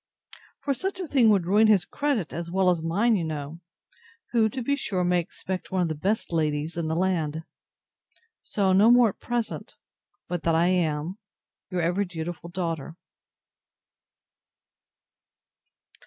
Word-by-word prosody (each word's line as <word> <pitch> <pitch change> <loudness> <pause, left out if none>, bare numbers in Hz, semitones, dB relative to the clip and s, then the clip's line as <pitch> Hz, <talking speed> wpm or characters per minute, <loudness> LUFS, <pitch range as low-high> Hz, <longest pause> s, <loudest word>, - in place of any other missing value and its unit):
For 280 - 0
such 380 +8 -3
a 365 - -4
thing 255 -6 +4
would 195 -5 +3
ruin 210 +5 +4
his 200 -5 +4
credit, 275 - -1
as 170 0 -5
well 185 +1 +3
as 170 -2 -1
mine, 205 +8 +2
you 180 - 0
know: 155 0 -5 0.7
who, 225 -2 +3
to 255 +2 -5
be 280 +4 +1
sure, 190 -9 -2
may 180 0 +2
expect 185 +2 -5
one 185 -1 +1
of 170 - -1
the - - -1
best 190 +5 -1
ladies 155 0 0
in 165 -2 -2
the 160 - -1
land. 165 -4 0 1.0
So 195 -2 0
no 205 +4 +6
more 245 -1 +6
at - - -10
present, 240 -2 -4 0.5
but 175 -2 -3
that 165 0 +1
I 170 +2 +3
am 170 +1 0 0.5
Your 180 -2 -1
ever 175 +4 +1
dutiful 170 -1 -6
DAUGHTER. 165 -3 -4
180 Hz, 155 wpm, -26 LUFS, 165-215 Hz, 1.0 s, no